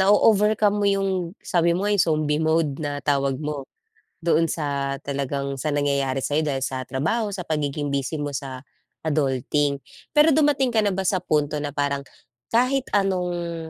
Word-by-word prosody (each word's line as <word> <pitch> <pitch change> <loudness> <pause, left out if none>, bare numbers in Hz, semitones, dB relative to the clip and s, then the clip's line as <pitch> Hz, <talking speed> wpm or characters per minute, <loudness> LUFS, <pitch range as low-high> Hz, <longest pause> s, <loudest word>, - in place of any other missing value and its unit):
nao-overcome 210 +1 +4
mo 205 - +2
yung 195 0 +1 0.4
sabi 170 -1 +2
mo 190 - -2
nga, 205 - +2
yung 205 - +3
zombie 155 -1 +1
mode, 160 -3 +1
na 145 -1 -4
tawag 140 -2 +1
mo, 150 -1 -5 0.5
doon 165 -1 +2
sa 140 -3 -2
talagang 140 0 -2
sa 135 +3 -3
nangyayari 140 -2 0
sa'yo, 150 +2 +1
dahil 135 -3 -1
sa 130 -1 -3
trabaho, 165 - 0
sa 185 -3 -5
pagiging 145 -2 -2
busy 140 +3 -1
mo 145 -1 -3
sa 130 -1 -6 0.4
adulting. 145 -1 +1 0.3
Pero 300 +1 +5
dumating 285 -4 +2
ka 220 - +4
na 205 - +2
ba 190 0 -2
sa 185 -1 +1
punto 150 -3 0
na 145 - -2
parang, 140 0 -1 0.5
kahit 255 +3 +2
anong 175 -4 -2
155 Hz, 165 wpm, -24 LUFS, 140-195 Hz, 0.5 s, Pero